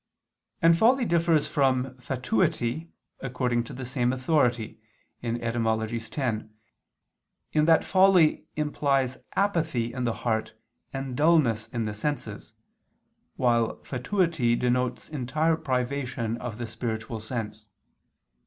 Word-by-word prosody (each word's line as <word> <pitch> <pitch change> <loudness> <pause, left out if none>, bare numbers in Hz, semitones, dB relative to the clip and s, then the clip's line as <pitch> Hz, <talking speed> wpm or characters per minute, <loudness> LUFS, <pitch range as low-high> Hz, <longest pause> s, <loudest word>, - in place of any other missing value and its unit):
And 165 0 +7
folly 240 +7 +4
differs 170 -4 +3
from 130 -2 +1
fatuity, 125 +4 -1 0.3
according 125 -2 -1
to - - -9
the 130 0 -6
same 125 -1 0
authority 130 -5 +1 0.4
(Etym. 115 -1 -2
x), 120 -6 0 1.1
in 150 -1 +3
that 165 0 +5
folly 185 -4 +4
implies 140 -4 0 0.2
apathy 160 - 0
in 125 -1 -3
the 115 -2 0
heart 110 -1 0 0.4
and 135 -2 -4
dullness 140 -8 +3
in 115 0 -3
the 105 -1 -3
senses, 145 +8 -4 0.8
while 120 -2 +2
fatuity 140 -2 +1
denotes 125 +1 0
entire 155 +3 0
privation 130 -5 -2
of 120 -3 -6
the 120 - -4
spiritual 115 0 -4
sense. 110 -2 -5
125 Hz, 110 wpm, -27 LUFS, 115-150 Hz, 1.1 s, And